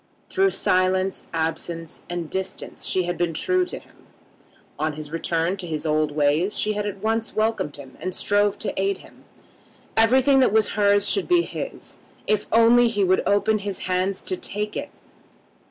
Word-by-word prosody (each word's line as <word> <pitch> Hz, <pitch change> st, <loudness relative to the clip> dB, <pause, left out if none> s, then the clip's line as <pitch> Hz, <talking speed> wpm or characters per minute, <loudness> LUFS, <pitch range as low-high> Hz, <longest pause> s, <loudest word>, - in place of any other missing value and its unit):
Through 390 Hz, 0 st, +3 dB
silence, 185 Hz, -, +1 dB
absence, 165 Hz, 0 st, -4 dB
and 175 Hz, -2 st, -3 dB
distance 190 Hz, +3 st, -5 dB
she 185 Hz, -, +1 dB
had 175 Hz, 0 st, -3 dB
been 170 Hz, -2 st, 0 dB
true 370 Hz, -, +1 dB
to -, -, -6 dB
him. -, -, -18 dB, 0.7 s
On 155 Hz, 0 st, 0 dB
his 150 Hz, 0 st, -8 dB
return 165 Hz, +2 st, -1 dB
to 185 Hz, -2 st, -5 dB
his 155 Hz, -1 st, -3 dB
old 155 Hz, -1 st, +1 dB
ways 150 Hz, +6 st, +1 dB
she 215 Hz, -, +1 dB
had 210 Hz, 0 st, -2 dB
at 200 Hz, 0 st, -6 dB
once 225 Hz, +1 st, -1 dB
welcomed 220 Hz, -8 st, 0 dB
him 135 Hz, -2 st, -11 dB
and 185 Hz, 0 st, -4 dB
strove 205 Hz, 0 st, +2 dB
to -, -, -3 dB
aid 195 Hz, 0 st, 0 dB
him. -, -, -19 dB, 0.7 s
Everything 260 Hz, +5 st, +5 dB
that 255 Hz, -, +4 dB
was 220 Hz, 0 st, +3 dB
hers 205 Hz, 0 st, +3 dB
should 395 Hz, -, +2 dB
be 350 Hz, -1 st, +4 dB
his, -, -, -7 dB, 0.3 s
if 210 Hz, -1 st, 0 dB
only 235 Hz, +2 st, +6 dB
he 205 Hz, -3 st, 0 dB
would 185 Hz, 0 st, +3 dB
open 205 Hz, +2 st, +2 dB
his 200 Hz, -1 st, -4 dB
hands 185 Hz, +1 st, 0 dB
to 185 Hz, -, -2 dB
take 210 Hz, +3 st, -4 dB
it. -, -, -4 dB
195 Hz, 175 wpm, -23 LUFS, 170-215 Hz, 0.7 s, only